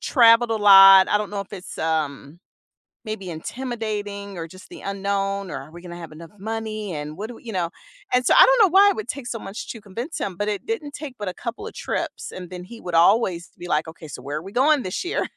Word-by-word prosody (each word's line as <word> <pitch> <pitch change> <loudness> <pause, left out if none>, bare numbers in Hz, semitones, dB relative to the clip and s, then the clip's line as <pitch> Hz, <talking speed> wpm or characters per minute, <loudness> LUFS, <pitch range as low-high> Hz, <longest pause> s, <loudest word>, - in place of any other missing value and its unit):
traveled 235 -2 +5
a 225 - +1
lot, 195 -2 +9
I 210 - +3
don't 210 -1 -4
know 200 -1 -3
if 200 - -9
it's, 185 -3 -8
um, 155 -1 -2 0.7
maybe 195 -4 -5
intimidating, 205 0 -5
or 165 - -5
just 185 +3 -14
the - - -11
unknown, 195 -1 -2
or - - -4
"Are 140 +3 -12
we 175 +1 -11
gonna 175 -1 -8
have 165 -3 -9
enough 165 +1 -12
money, 215 -1 -4
and 150 +1 -6
what 210 +3 -5
do 240 - -9
we" - - -16
you 225 -3 -7
know, 175 -2 -1 0.4
and 250 0 +3
so - - +4
I - - +10
don't - - +4
know - - +2
why 395 +2 +7
it 400 - 0
would 435 - -5
take 275 -4 -5
so 235 - -3
much 195 +1 -7
to 225 - -8
convince 235 - -6
him, 190 -3 -3
but 205 +2 -2
it 205 -2 -3
didn't 310 -11 -4
take 285 -4 -7
but 205 - -4
a - - -6
couple 245 - -6
of - - -9
trips, - - -4
and 180 -1 -8
then 180 -1 -8
he 230 +5 -12
would 175 -2 -4
always 180 -1 +3
be 175 - -7
like, 155 -1 0
“Okay, 160 -1 -10
so 140 - -8
where 145 +2 -4
are - - -4
we 195 - -9
going 280 +4 +3
this 185 - -3
year?” 355 - -1
200 Hz, 260 wpm, -23 LUFS, 175-230 Hz, 0.7 s, I